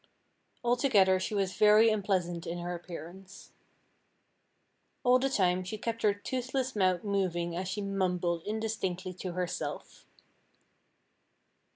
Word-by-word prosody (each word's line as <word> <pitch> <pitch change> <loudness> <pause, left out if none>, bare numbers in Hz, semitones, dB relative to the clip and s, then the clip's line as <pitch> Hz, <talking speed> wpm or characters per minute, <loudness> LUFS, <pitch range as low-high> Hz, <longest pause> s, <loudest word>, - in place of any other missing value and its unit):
Altogether 235 -7 +4
she 195 +3 -3
was 195 -2 0
very 215 +2 +6
unpleasant 185 -5 -1
in 170 +1 -3
her 175 0 -4
appearance. 175 +3 -10 1.5
All 250 0 +5
the 270 +1 +1
time 185 -6 +2
she 185 +4 -5
kept 230 +1 -4
her 210 - +4
toothless 255 +5 -3
mouth 185 -3 +2
moving 180 -4 -1
as 185 +1 -3
she 185 +3 -3
mumbled 180 -3 -1
indistinctly 205 -4 -2
to 180 -2 -4
herself. 180 0 -5
190 Hz, 115 wpm, -30 LUFS, 180-215 Hz, 1.5 s, very